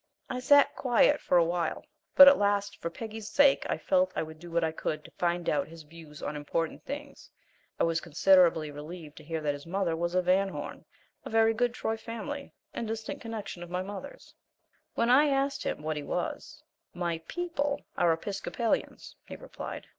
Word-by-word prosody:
I 250 Hz, -, -2 dB
sat 285 Hz, +2 st, +5 dB
quiet 255 Hz, +3 st, +3 dB
for 180 Hz, -, +3 dB
a 170 Hz, -, +5 dB
while, 170 Hz, -1 st, -2 dB, 0.3 s
but 280 Hz, -, +11 dB
at 280 Hz, -, +8 dB
last 205 Hz, 0 st, 0 dB
for 170 Hz, -, -2 dB
Peggy's 220 Hz, +3 st, -7 dB
sake 285 Hz, -1 st, +4 dB
I -, -, 0 dB
felt 280 Hz, -1 st, +2 dB
I -, -, 0 dB
would 160 Hz, 0 st, -10 dB
do 175 Hz, +1 st, -10 dB
what 170 Hz, 0 st, 0 dB
I 160 Hz, -, +1 dB
could 155 Hz, -1 st, -4 dB
to -, -, -13 dB
find 175 Hz, 0 st, -1 dB
out 145 Hz, -1 st, +1 dB
his 165 Hz, 0 st, -12 dB
views 150 Hz, -1 st, -13 dB
on 150 Hz, -, -3 dB
important 155 Hz, +2 st, -3 dB
things. 285 Hz, 0 st, -8 dB, 0.5 s
I -, -, +3 dB
was 165 Hz, -1 st, +1 dB
considerably 170 Hz, -2 st, +4 dB
relieved 150 Hz, +1 st, -9 dB
to -, -, -11 dB
hear 160 Hz, +1 st, -4 dB
that 145 Hz, -1 st, 0 dB
his 145 Hz, +2 st, -10 dB
mother 180 Hz, -2 st, 0 dB
was 170 Hz, +2 st, -2 dB
a 185 Hz, -, +3 dB
Van 190 Hz, +2 st, +3 dB
Horn, -, -, -7 dB, 0.4 s
a -, -, -7 dB
very 225 Hz, 0 st, +4 dB
good 245 Hz, +1 st, 0 dB
Troy 225 Hz, -2 st, -2 dB
family 235 Hz, +6 st, -6 dB, 0.2 s
and 230 Hz, -, -4 dB
distant 220 Hz, 0 st, -5 dB
connection 220 Hz, -6 st, -6 dB
of 175 Hz, -, -8 dB
mother's. 195 Hz, -, -6 dB, 0.6 s
When 235 Hz, +1 st, +2 dB
I 290 Hz, +4 st, +6 dB
asked 275 Hz, 0 st, 0 dB
him 150 Hz, -, -3 dB
what 155 Hz, 0 st, -2 dB
he -, -, -3 dB
was, -, -, -4 dB, 0.3 s
"My 170 Hz, -2 st, -2 dB
PEOPLE 320 Hz, -5 st, -2 dB
are 170 Hz, -, +3 dB
Episcopalians," 195 Hz, +6 st, -2 dB
he -, -, -7 dB
replied. -, -, -8 dB
185 Hz, 190 wpm, -29 LUFS, 165-235 Hz, 0.6 s, but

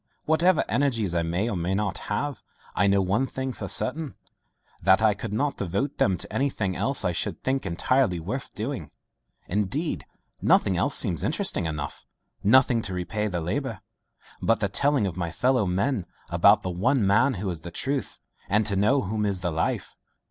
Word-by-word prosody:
Whatever 160 Hz, +2 st, +3 dB
energies 115 Hz, -7 st, +1 dB
I 85 Hz, -, +1 dB
may 85 Hz, +6 st, -1 dB
or 115 Hz, -, -2 dB
may 90 Hz, +2 st, -1 dB
not 100 Hz, -2 st, -1 dB
have, 140 Hz, +7 st, -2 dB, 0.3 s
I 100 Hz, -, +2 dB
know 100 Hz, 0 st, +3 dB
one 105 Hz, +8 st, +1 dB
thing 130 Hz, 0 st, -4 dB
for -, -, -6 dB
certain, 150 Hz, +1 st, 0 dB, 0.7 s
that 95 Hz, -1 st, +5 dB
I 110 Hz, -1 st, +4 dB
could 100 Hz, +2 st, -6 dB
not 140 Hz, +7 st, -1 dB
devote 100 Hz, -, -2 dB
them 95 Hz, -2 st, +3 dB
to -, -, -7 dB
anything 110 Hz, -9 st, 0 dB
else 135 Hz, -1 st, +1 dB
I 90 Hz, -, +2 dB
should 85 Hz, -, -3 dB
think 130 Hz, -5 st, -1 dB
entirely 95 Hz, +2 st, +1 dB
worth 105 Hz, +11 st, -4 dB
doing. 110 Hz, -, -4 dB, 0.6 s
Indeed 105 Hz, -, -2 dB, 0.3 s
nothing -, -, +3 dB
else -, -, +1 dB
seems -, -, 0 dB
interesting 85 Hz, -, 0 dB
enough 75 Hz, -2 st, -5 dB, 0.4 s
nothing 120 Hz, +1 st, +5 dB
to 95 Hz, -4 st, -3 dB
repay 105 Hz, +4 st, -2 dB
the 90 Hz, -4 st, -2 dB
labour, 85 Hz, +3 st, -3 dB, 0.6 s
but 115 Hz, -, +2 dB
the 100 Hz, -3 st, 0 dB
telling 140 Hz, +2 st, +2 dB
of 90 Hz, -2 st, -4 dB
my 85 Hz, -2 st, -2 dB
fellow 125 Hz, +4 st, +1 dB
men 100 Hz, -, 0 dB, 0.2 s
about -, -, +5 dB
the 90 Hz, -, -2 dB
one 115 Hz, +6 st, +2 dB
man 115 Hz, +7 st, +3 dB
who 100 Hz, +1 st, -4 dB
is 85 Hz, -2 st, -7 dB
the 85 Hz, -, -7 dB
truth, 135 Hz, -, -3 dB, 0.3 s
and 105 Hz, +2 st, +3 dB
to 100 Hz, -1 st, -1 dB
know 125 Hz, +8 st, +3 dB
whom 105 Hz, +2 st, -2 dB
is 100 Hz, -3 st, -1 dB
the 85 Hz, -1 st, -1 dB
life. 80 Hz, +1 st, -2 dB
105 Hz, 185 wpm, -26 LUFS, 90-130 Hz, 0.7 s, that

